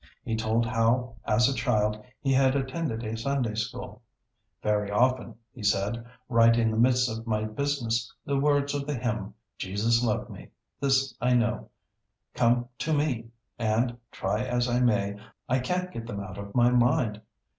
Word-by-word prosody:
He 115 - -2
told 110 +1 +1
how 115 +1 +1
as 115 +3 +4
a 135 - +1
child 105 -3 0 0.2
he 135 -1 +1
had 130 0 +4
attended 135 -3 -2
a 110 0 -3
Sunday 120 -1 -1
School. 110 -1 -5 0.6
'Very 105 -1 +1
often,' 120 +1 +1 0.2
he 125 - -11
said, 105 +3 0 0.2
'right 115 -1 +5
in 115 -1 +2
the - - -2
midst 125 +1 +4
of 115 0 -5
my 110 -1 0
business 115 -1 -1
the 140 -1 0
words 145 0 +2
of 140 -1 -3
the 150 - -1
hymn, 115 -5 -3 0.2
"Jesus 110 +5 +1
loves 110 -3 0
me, - - -11 0.3
this 135 0 +2
I 125 +1 +3
know," 120 -1 0 0.6
come 120 0 +2
to 160 - 0
me, 135 -6 0 0.3
and, 115 +2 +1 0.2
try 105 +4 -1
as 125 -1 0
I 120 0 +1
may, 105 -4 +1 0.3
I 130 +1 +2
can't 180 +7 -2
get 115 -6 -7
them 105 -4 -4
out 95 -1 -7
of 100 0 -8
my 120 0 +5
mind. 120 -3 +2
120 Hz, 170 wpm, -27 LUFS, 110-130 Hz, 0.6 s, right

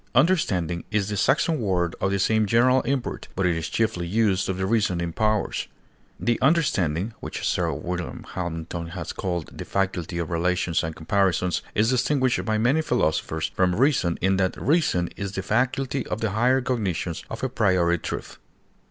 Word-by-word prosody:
Understanding 95 - +2
is 105 -2 0
the 105 - -2
Saxon 145 - +2
word 90 -5 0
of 95 - +2
the 100 - +1
same 110 +2 +2
general 125 +5 +4
import, 135 0 -2
but 95 - 0
is 80 -2 0
chiefly 90 -6 0
used 100 -1 +1
of 95 - -1
the 95 - -1
reasoning 90 -6 0
powers; 110 +1 0 0.5
the 120 0 0
understanding, 110 - +2
which - - -4
Sir - - +1
Wm. 90 -1 -5
Hamilton 85 -1 -4
has 90 +2 -6
called 90 -4 -4
"the - - -6
faculty 90 -3 -2
of 85 0 -3
relations 85 0 +1
and 80 -1 -4
comparisons," 90 +1 +1
is 110 +3 +3
distinguished 130 0 +1
by 110 -1 +1
many 125 +8 +3
philosophers 80 - 0
from 90 -1 +2
reason 120 - +2
in 95 +1 +2
that 95 -1 0
"reason 140 - +2
is 100 -1 -4
the 95 - -3
faculty 130 +3 0
of - - -3
the 110 -3 -1
higher 125 +5 +3
cognitions 95 -9 -2
or 115 - -5
a - - +2
priori 95 -8 +2
truth." - - -6
95 Hz, 170 wpm, -25 LUFS, 85-120 Hz, 0.5 s, general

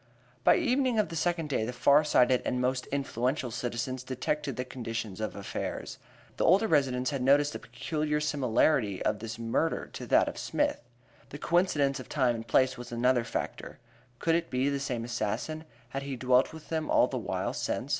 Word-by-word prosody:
By - - +6
evening 255 -2 +1
of 215 - +2
the 165 - -6
second 170 -1 0
day 130 -6 0
the 115 - -2
far 140 +4 +4
sighted 125 -4 +3
and 125 - -1
most 125 0 0
influential 130 -2 -1
citizens 120 +2 -3
detected 135 +2 -2
the 125 - -3
condition 115 -5 -5
of 110 - -3
affairs. 100 - -5 0.4
The - - 0
older 195 +6 +5
residents 130 -5 +2
had 140 -2 -2
noticed 145 +3 +4
the - - -5
peculiar 150 -1 -2
similarity 130 -6 +1
of 105 -1 +1
this 115 0 -6
murder 115 +8 -1
to - - -7
that - - +4
of - - -5
Smith. - - 0 0.5
The 145 - -7
coincidence 145 -5 +1
of 130 - -10
time 130 -5 +2
and 115 0 -6
place 130 +2 +2
was 120 0 -8
another 120 +1 +2
factor. - - -5 0.4
Could 165 - +1
it 170 0 0
be 130 +2 +1
the 140 -1 -1
same 125 -4 -3
assassin? 120 +8 -3 0.2
Had 135 +3 -4
he 140 -1 -4
dwelt 125 +1 +3
with 160 -1 -12
them 160 -1 -2
all - - +5
the - - -3
while - - -2
since? - - -3
130 Hz, 190 wpm, -29 LUFS, 120-150 Hz, 0.5 s, By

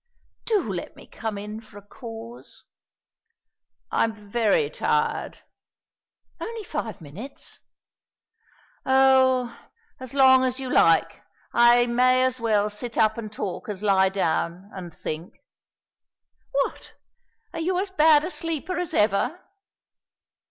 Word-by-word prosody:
"Do 395 - 0
let 175 - -6
me - - -14
come 220 -2 -5
in 210 +2 -7
for 215 -2 -16
a - - -10
cause." 230 +1 -10 1.3
"I'm 210 -3 -1
very 240 - +2
tired." - - -1 1.0
"Only 455 -1 -6
five 265 - -5
minutes." 190 - -10 1.2
"Oh, 260 -2 +4 0.4
as 260 +1 -9
long 260 -1 +6
as 255 0 -1
you 260 -1 -5
like. 165 0 +3 0.3
I 240 0 +6
may 255 +2 +3
as 255 -1 -1
well 210 -2 +2
sit 230 +3 -7
up 220 0 +3
and 215 -2 -7
talk 200 -1 -5
as 205 -1 -5
lie 190 -2 +4
down, 185 +1 -2
and 180 -3 -8
think." 160 +2 -6 1.2
"What, 275 0 -2 0.6
are - - -5
you 355 +3 0
as 385 +1 -2
bad 305 -4 +5
a 360 - -4
sleeper 330 +1 -3
as 355 -2 -3
ever?" 220 - +1
235 Hz, 125 wpm, -24 LUFS, 205-265 Hz, 1.3 s, long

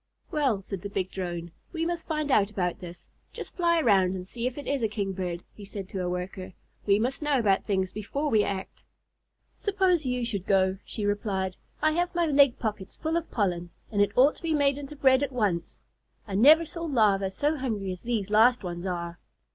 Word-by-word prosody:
"Well," 265 -10 +1
said 195 -2 -6
the 200 - -5
big 190 -2 -2
Drone, 175 -2 -4 0.2
"we 330 -1 -2
must 340 -1 -3
find 305 -2 -1
out 205 -5 +4
about 180 -4 -2
this. 175 -1 -10 0.3
Just - - -7
fly 340 -2 +3
around 195 - +3
and 180 0 -6
see 235 +4 -3
if 255 - -5
it 290 - -6
is 280 -2 -1
a 225 - +2
Kingbird," 190 -4 -3
he 210 - -12
said 195 -1 -7
to 190 - -4
a 180 - -1
Worker. 180 +1 -5 0.3
"We 200 0 +5
must 250 +7 -1
know 295 -2 +2
about 205 -5 +2
things 190 -2 0
before 275 +9 -3
we 215 -2 +4
act." 195 -2 -5 0.7
"Suppose 380 -5 +1
you 250 -2 -1
should 200 -5 -4
go," 190 -1 +2
she 210 - -5
replied. 195 -3 -1 0.3
"I 310 - +4
have 350 +2 -1
my 345 -1 +2
leg 280 -4 +4
pockets 210 -4 -4
full 320 +1 -2
of 335 -1 -2
pollen, 175 -5 -1 0.2
and 205 -2 +2
it 205 - +2
ought 275 +4 +6
to - - -16
be 325 -2 0
made 280 -1 +2
into 290 +1 -8
bread 265 -2 +4
at 285 -2 -1
once. 205 -9 -1 0.5
I 200 - -6
never 300 +11 +7
saw 335 +1 -4
Larvæ 205 -8 +2
so 295 +9 0
hungry 215 -8 -2
as 180 - -7
these 220 -4 -2
last 230 +2 +5
ones 175 0 -4
are." 170 -1 -4
215 Hz, 210 wpm, -27 LUFS, 190-285 Hz, 0.7 s, never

